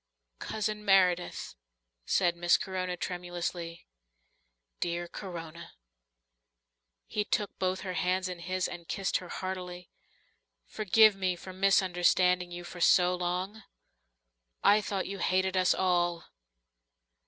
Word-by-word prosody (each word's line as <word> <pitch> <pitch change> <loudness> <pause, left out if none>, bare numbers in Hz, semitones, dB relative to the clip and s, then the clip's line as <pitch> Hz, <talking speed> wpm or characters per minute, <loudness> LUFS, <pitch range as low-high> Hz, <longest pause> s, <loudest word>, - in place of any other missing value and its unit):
"Cousin 215 -1 -3
Meredith," 185 -3 +2 0.5
said 175 -2 +2
Miss 175 0 +3
Corona 185 -1 -3
tremulously. 175 -1 -5 0.9
"Dear 175 0 -2
Corona." 170 -3 -8 1.3
He 210 - -1
took 205 -1 -2
both 185 0 0
her 185 -2 -4
hands 185 +1 0
in 180 -1 -6
his, 185 +2 -1
and 170 -1 -9
kissed 195 -1 0
her 180 - -10
heartily. 180 -1 -6 0.7
"Forgive 215 0 +4
me 185 -2 0
for 185 +2 -10
misunderstanding 180 -1 +3
you 175 0 -7
so 180 +1 +3
long. 180 +4 -3 1.0
I 210 +1 +6
thought 195 -2 -2
you 195 0 -6
hated 185 0 +1
us 185 -1 +3
all." 175 -2 +1
180 Hz, 110 wpm, -30 LUFS, 175-190 Hz, 1.3 s, I